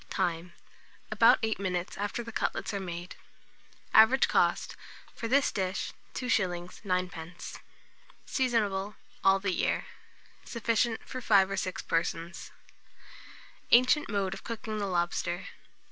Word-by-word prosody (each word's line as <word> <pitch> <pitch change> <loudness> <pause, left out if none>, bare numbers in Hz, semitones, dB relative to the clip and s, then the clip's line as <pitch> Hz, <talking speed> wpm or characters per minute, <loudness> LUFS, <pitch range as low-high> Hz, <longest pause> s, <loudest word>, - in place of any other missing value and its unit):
Time. 175 -1 -2 0.6
About - - +6
8 220 -2 0
minutes 180 -2 -2
after 205 +4 -3
the 230 - -8
cutlets 220 - -2
are 200 - -1
made. 175 -1 -6 0.8
Average 220 +5 +7
cost - - +1 0.4
for 230 - -5
this 270 +4 +3
dish, 190 -1 -2 0.2
2s. 180 -8 -1
9d. 180 -3 -4 0.7
Seasonable 210 -6 0 0.3
all 195 0 +6
the 195 -1 -1
year. - - 0 0.6
Sufficient 230 0 -1
for 255 - -5
5 195 -4 +4
or - - 0
6 185 0 -3
persons. 165 +1 -2 1.2
ANCIENT 255 +4 +5
MODE 200 -2 -1
OF 195 - -9
COOKING 220 -2 -4
THE 200 - -1
LOBSTER. 175 0 -1
195 Hz, 120 wpm, -29 LUFS, 180-225 Hz, 1.2 s, Average